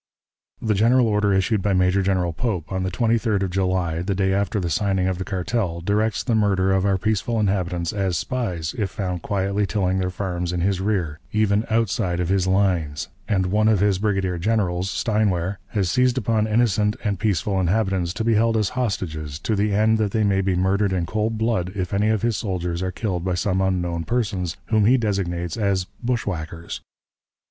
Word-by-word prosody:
"The 110 -2 0
general 120 +5 +4
order 105 -1 +2
issued 95 +2 +2
by 100 +1 +1
Major 90 +1 +3
General 90 -3 0
Pope, 95 -6 -3
on 95 0 -1
the 95 - -1
23d 110 0 +1
of 95 - -2
July, 90 -3 0
the 95 +2 -1
day 95 0 +1
after 100 +1 0
the 90 - -2
signing 95 +2 +1
of 95 -1 -1
the - - -2
cartel, 95 -2 -2
directs 105 +4 0
the 120 - 0
murder 100 -3 +2
of 95 +1 +2
our 100 -1 +2
peaceful 110 +3 0
inhabitants 90 -4 0
as 95 -4 0
spies, 90 -8 -2
if 100 -3 0
found 90 -4 -3
quietly 100 +2 -1
tilling 95 -3 0
their 90 -1 0
farms 90 -2 -3
in 90 -1 -2
his 95 0 0
rear, 90 -7 -1
even 105 0 +1
outside 110 -5 0
of 90 -1 -1
his 95 -1 +2
lines; 90 -8 0 0.2
and 95 -3 +1
one 110 +1 +3
of 110 -3 +4
his 100 -1 +2
brigadier 95 -4 0
generals, 95 -2 0
Steinwehr, 100 -4 0
has 95 -5 -1
seized 125 0 +2
upon 110 -2 +1
innocent 105 -2 +2
and 100 -4 -1
peaceful 100 -2 0
inhabitants, 95 -2 +1
to 110 - -3
be 115 0 +2
held 115 +1 +3
as 105 -3 +1
hostages, 85 - -3
to 105 +7 -1
the 105 +1 +1
end 110 +2 +3
that 105 -2 +1
they 110 - +2
may 100 -2 +2
be 95 -1 0
murdered 95 +2 +1
in 90 -2 0
cold 110 +4 -1
blood 110 -5 0
if 90 -2 -3
any 105 +2 +2
of 110 0 0
his 115 -2 +1
soldiers 90 -5 -2
are 95 0 -1
killed 90 -3 -3
by 90 -1 0
some 95 +1 0
unknown 90 -3 -1
persons, 100 -6 -2
whom 110 -2 +3
he 125 +4 +5
designates 90 -6 -2
as 100 -4 +1 0.2
'bushwhackers.' 85 -9 -3
95 Hz, 195 wpm, -23 LUFS, 90-110 Hz, 0.2 s, he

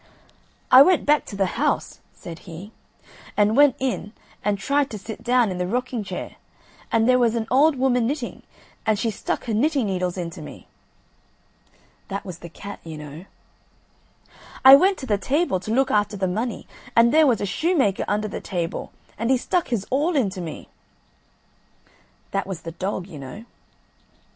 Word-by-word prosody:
"I 255 +1 +10
went 350 +3 +5
back 295 0 +3
to 200 - -8
the 195 -1 +1 0.2
house," 300 - 0
said 165 -1 -10
he, 175 +6 -9 0.7
"and 210 +1 +3
went 285 -2 +6
in 215 -5 -3 0.3
and 205 -1 +1
tried 280 +4 +1
to 215 - -6
sit 215 +2 -8
down 240 -3 +3
in 180 - -4
the 180 - -1
rocking 245 +1 -2
chair, - - -7 0.5
and 225 0 +3
there 255 0 +5
was 235 -2 +2
an 225 -1 -1
old 285 +4 +5
woman 250 -3 +2
knitting, 275 -2 -4 0.4
and 215 -1 +1
she 225 +2 -1
stuck - - -3
her 230 - -2
knitting 275 +3 +1
needles 185 -2 -2
into 170 -1 -5
me." - - -10 1.4
That 200 +1 -5
was 180 -3 -8
the 170 - -10
cat, 200 +4 -9
you 160 -2 -8
know. 150 +3 -9 1.4
"I 265 - +12
went 380 +7 +3
to 265 - -7
the 205 -5 0
table 275 - 0
to 215 - -6
look 265 +3 +2
after 205 0 +1
the 190 -1 0
money 220 +6 -3 0.3
and 230 +1 +5
there 310 -1 +6
was 240 -5 +2
a - - -1
shoemaker 270 - +1
under 210 +1 0
the 200 - -6
table, 170 -3 -4 0.3
and 230 +2 -1
he 260 - +4
stuck 350 +7 -1
his 225 -6 -2
awl 300 +6 +1
into 195 -9 0
me." 165 -3 -7 1.6
That 195 0 -2
was 190 -4 -5
the 165 - -7
dog, 185 +1 -4
you 170 -6 -10
know. 140 - -9
220 Hz, 175 wpm, -23 LUFS, 190-265 Hz, 1.6 s, I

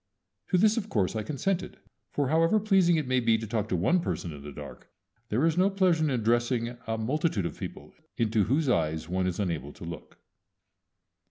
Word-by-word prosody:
To 185 - +2
this 215 +4 +4
of 215 -2 -2
course 100 - 0
I 110 - -1
consented; 175 - -2 0.3
for, 140 -3 -1
however 165 +7 +3
pleasing 195 -5 +4
it 155 -3 0
may 130 0 +2
be 115 -2 +3
to 110 - -5
talk 110 0 -2
to - - +1
one 95 - +2
person 85 - -3
in 70 - -10
the 75 +1 -8
dark, - - -10 0.4
there 125 +9 +2
is 165 +1 +2
no 190 +2 +4
pleasure 185 -5 +2
in 155 - +2
addressing 120 -1 +1 0.2
a 115 0 -1
multitude 125 - 0
of - - -5
people - - -8 0.2
into 110 -3 +2
whose 140 +6 +1
eyes 80 -8 0
one 90 +1 0
is 90 +1 -3
unable 80 -8 -2
to - - -12
look. 85 -1 -8
120 Hz, 200 wpm, -28 LUFS, -, 0.4 s, this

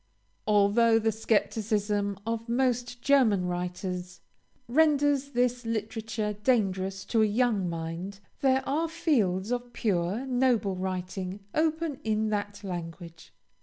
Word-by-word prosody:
Although 215 +2 +4
the 225 0 +2
scepticism 210 -2 0
of 230 0 -3
most 245 -1 0
German 235 -10 +4
writers 180 0 -4 0.5
renders 285 0 +3
this 245 0 +1
literature 220 -1 -3
dangerous 195 -4 0
to 225 +2 +2
a - - +5
young 210 -4 +1
mind, 170 +4 -5 0.2
there 265 -1 +2
are 320 +4 0
fields 230 - +1
of 245 0 -3
pure, 200 +2 0
noble 245 -6 +1
writing 185 +1 -4
open 315 -2 0
in 220 0 0
that 205 0 -3
language. 170 -2 -7
215 Hz, 115 wpm, -28 LUFS, 190-245 Hz, 0.5 s, a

